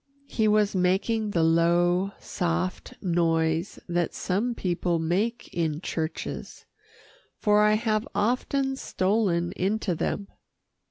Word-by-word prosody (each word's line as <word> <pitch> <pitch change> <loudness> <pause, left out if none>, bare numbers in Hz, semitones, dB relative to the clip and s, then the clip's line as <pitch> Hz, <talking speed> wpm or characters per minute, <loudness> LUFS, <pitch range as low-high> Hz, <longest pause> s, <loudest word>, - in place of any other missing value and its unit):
He 220 -5 0
was 210 -1 +3
making 195 +4 +1
the 170 -5 +1
low, 175 +3 +3
soft 180 +1 -2
noise 165 -1 +1
that 175 -1 -1
some 220 +6 -1
people 175 -3 0
make 195 +9 -1
in 160 -3 -1
churches, 160 -2 -5 0.7
for 210 0 +3
I 210 0 +5
have 215 +2 0
often 265 +4 0
stolen 185 -6 0
into 195 0 -1
them. 200 +4 -2
185 Hz, 110 wpm, -26 LUFS, 170-215 Hz, 0.7 s, I